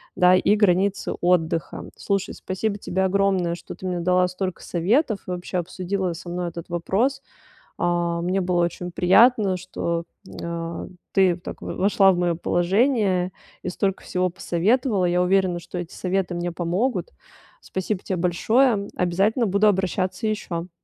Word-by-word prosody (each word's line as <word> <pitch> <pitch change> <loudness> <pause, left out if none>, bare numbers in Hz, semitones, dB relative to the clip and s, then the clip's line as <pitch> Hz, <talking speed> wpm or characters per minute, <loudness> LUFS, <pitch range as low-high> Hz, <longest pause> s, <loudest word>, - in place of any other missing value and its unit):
да, 180 0 +6
и 200 +3 +3
границы 200 -1 +2
отдыха. 170 -2 0
Слушай, 195 -2 -2
спасибо 200 +2 -3
тебе 190 0 -1
огромное, 190 -2 +1
что 170 - -8
ты 185 - -10
мне 180 -1 -1
дала 180 +1 +3
столько 185 0 -4
советов 210 - +1
и - - -3
вообще 180 +1 -3
обсудила 185 +1 -2
со 175 +2 -10
мной 175 0 -2
этот 170 +1 -9
вопрос. 210 +11 0 0.6
Э, 175 -1 0
мне 180 +3 0
было 175 -1 +1
очень 175 +1 -3
приятно, 195 +2 +4
что, 170 -2 -3 0.2
э, 170 0 -5 0.3
ты 190 -3 +4
так 175 - -9
в - - -4
вошла 195 0 +4
в 180 - -1
моё 175 -1 +1
положение 190 - +1 0.3
и - - -2
столько 195 +1 -1
всего 185 0 0
посоветовала. 195 +4 +1
Я 180 +1 +2
уверена, 185 -1 +2
что 170 +1 -7
эти 175 -1 -7
советы 185 -1 -1
мне 175 0 -2
помогут. 180 +4 -1 0.5
Спасибо 190 +1 -3
те 190 - -2
большое. 200 +5 +2
Обязательно 195 +7 +1
буду 200 +2 +2
обращаться 190 0 0
ещё. 180 -5 -3
185 Hz, 155 wpm, -23 LUFS, 175-200 Hz, 0.6 s, да